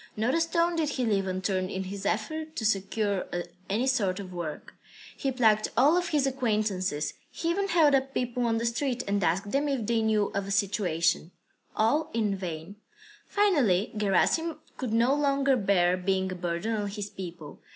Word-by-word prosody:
Not 225 Hz, +4 st, +1 dB
a 330 Hz, -, +2 dB
stone 335 Hz, +1 st, +1 dB
did 310 Hz, -3 st, +1 dB
he 255 Hz, -3 st, -1 dB
leave 200 Hz, -3 st, +1 dB
unturned 185 Hz, 0 st, -1 dB
in 190 Hz, -1 st, -3 dB
his 195 Hz, +1 st, -5 dB
efforts 310 Hz, +10 st, -2 dB
to 220 Hz, -, -3 dB
secure 200 Hz, -1 st, 0 dB, 0.4 s
any 220 Hz, +6 st, +1 dB
sort 205 Hz, -8 st, +1 dB
of 185 Hz, -2 st, -8 dB
work. 170 Hz, -4 st, -6 dB, 0.4 s
He 275 Hz, -, -1 dB
plagued 220 Hz, -4 st, +3 dB
all 285 Hz, +7 st, +5 dB
of 360 Hz, 0 st, +1 dB
his 295 Hz, -3 st, +1 dB
acquaintances, 210 Hz, -, -1 dB, 0.2 s
he 335 Hz, -, -2 dB
even 395 Hz, +3 st, 0 dB
held 320 Hz, -6 st, +4 dB
up 270 Hz, 0 st, +2 dB
people 245 Hz, -1 st, -1 dB
on 225 Hz, 0 st, +1 dB
the 230 Hz, -, -1 dB
street 245 Hz, +2 st, -1 dB
and 200 Hz, -1 st, 0 dB
asked 190 Hz, +5 st, 0 dB
them 285 Hz, +2 st, +1 dB
if 265 Hz, -6 st, -1 dB
they 230 Hz, +1 st, +1 dB
knew 215 Hz, -2 st, +1 dB
of 200 Hz, 0 st, -2 dB
a -, -, -6 dB
situation 185 Hz, -5 st, +1 dB, 0.5 s
all 295 Hz, +9 st, +2 dB
in 210 Hz, -3 st, +1 dB
vain. 175 Hz, +1 st, -6 dB, 0.5 s
Finally 280 Hz, -, +2 dB
Gerasim 215 Hz, -, +1 dB, 0.2 s
could 255 Hz, -5 st, -4 dB
no 235 Hz, +4 st, +3 dB
longer 275 Hz, -2 st, +2 dB
bear 190 Hz, -5 st, +3 dB
being 190 Hz, 0 st, 0 dB
a -, -, -4 dB
burden 175 Hz, +5 st, -2 dB
on 205 Hz, -1 st, -2 dB
his 205 Hz, 0 st, -5 dB
people. 170 Hz, -5 st, -8 dB
215 Hz, 185 wpm, -28 LUFS, 190-270 Hz, 0.5 s, all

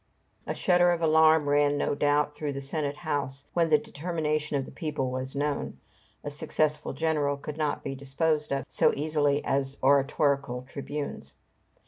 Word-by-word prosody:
A -, -, -2 dB
shudder 175 Hz, -1 st, +4 dB
of 170 Hz, -1 st, 0 dB
alarm 160 Hz, -1 st, +5 dB
ran, 145 Hz, 0 st, +3 dB
no -, -, 0 dB
doubt, 145 Hz, +1 st, +1 dB
through 150 Hz, -1 st, -4 dB
the 140 Hz, -, -4 dB
Senate 145 Hz, +1 st, -2 dB
house, 145 Hz, -3 st, -3 dB
when 170 Hz, -1 st, +2 dB
the 155 Hz, -, +6 dB
determination 155 Hz, -1 st, -2 dB
of 135 Hz, -, -2 dB
the -, -, -11 dB
people 150 Hz, -6 st, -3 dB
was 130 Hz, +1 st, -4 dB
known. 145 Hz, 0 st, -2 dB, 0.5 s
A 145 Hz, -, -4 dB
successful 150 Hz, 0 st, -1 dB
general 150 Hz, -3 st, 0 dB
could 145 Hz, +1 st, -7 dB
not 150 Hz, -2 st, -1 dB
be 135 Hz, -, -3 dB
disposed 150 Hz, +3 st, -1 dB
of 135 Hz, 0 st, -1 dB
so -, -, +3 dB
easily 145 Hz, -1 st, +1 dB
as 135 Hz, 0 st, -1 dB
oratorical 140 Hz, -2 st, +2 dB
tribunes. 140 Hz, +2 st, -6 dB
145 Hz, 160 wpm, -28 LUFS, 140-155 Hz, 0.5 s, the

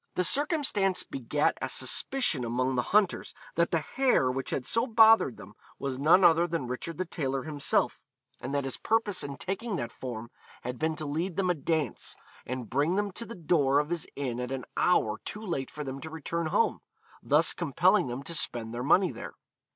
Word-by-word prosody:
The 180 Hz, -, +2 dB
circumstance 265 Hz, -, +2 dB
begat 135 Hz, +3 st, -1 dB
a -, -, -2 dB
suspicion 250 Hz, -, 0 dB
among 125 Hz, +3 st, 0 dB
the 125 Hz, -, +1 dB
hunters 205 Hz, -2 st, +2 dB, 0.2 s
that 170 Hz, +1 st, +2 dB
the 165 Hz, -, +1 dB
hare 245 Hz, -, +2 dB
which 135 Hz, +1 st, -4 dB
had 125 Hz, -, -2 dB
so 230 Hz, -, +1 dB
bothered 225 Hz, -, +6 dB
them 105 Hz, -, -12 dB, 0.2 s
was 135 Hz, -2 st, -4 dB
none 165 Hz, +6 st, +5 dB
other 170 Hz, 0 st, +5 dB
than 165 Hz, -6 st, -2 dB
Richard 125 Hz, +6 st, -5 dB
the 185 Hz, -, -1 dB
Tailor 135 Hz, -6 st, -2 dB
himself, 150 Hz, -2 st, 0 dB, 0.4 s
and 135 Hz, -, -5 dB
that 140 Hz, 0 st, 0 dB
his 135 Hz, -, -4 dB
purpose 215 Hz, -3 st, 0 dB
in 140 Hz, -1 st, -6 dB
taking 195 Hz, -, -3 dB
that 120 Hz, -8 st, -3 dB
form 120 Hz, -2 st, -7 dB, 0.3 s
had 125 Hz, 0 st, -5 dB
been 160 Hz, 0 st, 0 dB
to 155 Hz, -, -5 dB
lead 165 Hz, +5 st, -2 dB
them 185 Hz, -1 st, +1 dB
a -, -, +2 dB
dance 155 Hz, -4 st, -2 dB, 0.3 s
and 125 Hz, -2 st, -4 dB
bring 145 Hz, -, +1 dB
them 205 Hz, 0 st, 0 dB
to 230 Hz, +5 st, -7 dB
the 230 Hz, -, -8 dB
door 150 Hz, -5 st, +2 dB
of 150 Hz, +2 st, +1 dB
his 170 Hz, -2 st, -1 dB
inn 125 Hz, -4 st, -3 dB
at 125 Hz, 0 st, -3 dB
an 135 Hz, -1 st, -4 dB
hour 110 Hz, -11 st, +2 dB
too 215 Hz, +1 st, -6 dB
late 170 Hz, -8 st, -2 dB
for 150 Hz, -, -6 dB
them 135 Hz, 0 st, -6 dB
to 160 Hz, -, -7 dB
return 160 Hz, +1 st, -3 dB
home, -, -, +1 dB, 0.4 s
thus -, -, +3 dB
compelling -, -, +2 dB
them 125 Hz, +3 st, -5 dB
to 170 Hz, -, -6 dB
spend 120 Hz, -6 st, -2 dB
their 120 Hz, -, -3 dB
money 180 Hz, +6 st, +4 dB
there. -, -, -8 dB
155 Hz, 200 wpm, -29 LUFS, 130-185 Hz, 0.4 s, bothered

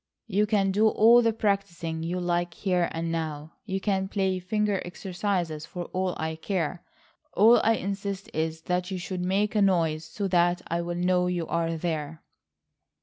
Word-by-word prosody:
"You 210 Hz, 0 st, +1 dB
can 200 Hz, -3 st, +2 dB
do 210 Hz, +3 st, +4 dB
all 230 Hz, +3 st, +6 dB
the 230 Hz, -1 st, +3 dB
practising 195 Hz, -7 st, -1 dB
you 175 Hz, +3 st, -2 dB
like 175 Hz, -1 st, -1 dB
here 180 Hz, -3 st, 0 dB
and 165 Hz, 0 st, -3 dB
now. 155 Hz, -1 st, -4 dB
You 195 Hz, -2 st, -2 dB
can 190 Hz, -1 st, 0 dB
play 190 Hz, -2 st, 0 dB
finger 205 Hz, +2 st, 0 dB
exercises 175 Hz, -3 st, -3 dB
for 175 Hz, -1 st, -6 dB
all 185 Hz, -1 st, -1 dB
I 160 Hz, 0 st, -3 dB
care. 175 Hz, -1 st, -2 dB, 0.5 s
All 225 Hz, +4 st, +6 dB
I 225 Hz, -, +4 dB
insist 195 Hz, -1 st, -4 dB
is 160 Hz, 0 st, -2 dB
that 180 Hz, +1 st, -1 dB
you 190 Hz, -, -3 dB
should 180 Hz, 0 st, -4 dB
make 195 Hz, +3 st, +1 dB
a 210 Hz, -, +2 dB
noise 165 Hz, -5 st, +2 dB
so 200 Hz, +4 st, -3 dB
that 175 Hz, 0 st, +2 dB
I'll 170 Hz, +1 st, -2 dB
know 180 Hz, 0 st, +2 dB
you 175 Hz, -2 st, -1 dB
are 165 Hz, 0 st, -1 dB
there." 160 Hz, -2 st, -3 dB
180 Hz, 170 wpm, -27 LUFS, 165-200 Hz, 0.5 s, all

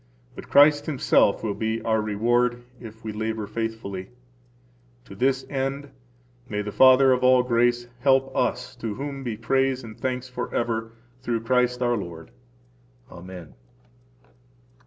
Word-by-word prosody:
But -, -, -11 dB
Christ 145 Hz, +1 st, +5 dB
Himself 130 Hz, -8 st, +2 dB
will 105 Hz, -2 st, -1 dB
be 110 Hz, +2 st, -2 dB
our 110 Hz, -1 st, +1 dB
reward 120 Hz, +3 st, 0 dB, 0.2 s
if 110 Hz, -2 st, -12 dB
we 110 Hz, -, -4 dB
labor 110 Hz, 0 st, -3 dB
faithfully. 105 Hz, -3 st, -5 dB, 1.0 s
To -, -, -12 dB
this 130 Hz, +1 st, 0 dB
end 135 Hz, +1 st, -3 dB, 0.6 s
may 105 Hz, 0 st, -2 dB
the 105 Hz, -, -5 dB
Father 130 Hz, +2 st, +6 dB
of 125 Hz, 0 st, +1 dB
all 130 Hz, 0 st, +5 dB
grace 120 Hz, 0 st, +1 dB
help 135 Hz, 0 st, +2 dB
us, 125 Hz, +1 st, -1 dB
to 115 Hz, -3 st, -4 dB
whom 140 Hz, 0 st, -6 dB
be 115 Hz, -4 st, -4 dB
praise 130 Hz, +3 st, 0 dB
and 110 Hz, -2 st, -10 dB
thanks 130 Hz, +1 st, -3 dB
forever 115 Hz, -2 st, -3 dB, 0.3 s
through 120 Hz, -3 st, -2 dB
Christ, 125 Hz, +1 st, +1 dB
our 120 Hz, -1 st, +1 dB
Lord! 85 Hz, -4 st, -8 dB, 0.8 s
Amen. 90 Hz, -4 st, -10 dB
120 Hz, 135 wpm, -24 LUFS, 110-130 Hz, 1.0 s, Father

